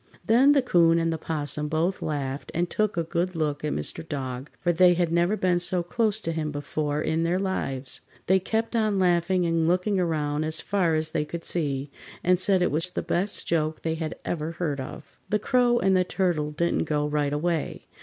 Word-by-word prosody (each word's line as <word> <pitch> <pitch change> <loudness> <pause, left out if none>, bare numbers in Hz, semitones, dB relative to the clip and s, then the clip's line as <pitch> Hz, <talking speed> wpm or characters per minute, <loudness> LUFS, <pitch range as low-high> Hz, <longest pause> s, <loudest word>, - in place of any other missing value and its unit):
Then 255 +6 +5
the 280 -3 +3
'Coon 170 -7 +4
and 165 0 +1
the 160 - -4
'Possum 150 -1 -2
both 165 +5 0
laughed 140 -2 -3
and 175 +2 +1
took 215 +1 -1
a 170 - +1
good 170 +2 -2
look 150 -2 -1
at 150 - -1
Mr. 75 - -3
Dog, 130 -1 -4
for 175 -1 +1
they 175 +1 +5
had 170 -1 0
never 175 +5 +2
been 180 -3 +2
so 180 0 +1
close 215 +3 0
to 165 - -2
him 155 -2 -2
before 145 +1 -2
in 160 +1 0
their 170 +2 +1
lives. 135 -9 -3 0.2
They 190 +1 +4
kept 225 +5 -2
on 215 -3 +2
laughing 180 0 +2
and 165 -1 +1
looking 185 +3 +1
around 155 -3 0
as 155 +1 -3
far 180 -5 +1
as 155 0 -1
they 155 -2 0
could 165 +2 -7
see, 140 -4 -2 0.3
and 180 0 +3
said 185 -1 +2
it - - +1
was 165 +5 +1
the - - -4
best 190 +4 0
joke 155 -1 -1
they 160 - 0
had 160 -1 -4
ever 160 -1 -3
heard 155 -4 -2
of. 130 - -10
The 210 - +2
Crow 245 +2 +2
and 195 -3 +3
the 185 - +4
Turtle 175 -5 0
didn't 170 +3 0
go 150 -1 0
right 150 -1 0
away. 160 +1 -2
170 Hz, 210 wpm, -26 LUFS, 150-185 Hz, 0.3 s, Then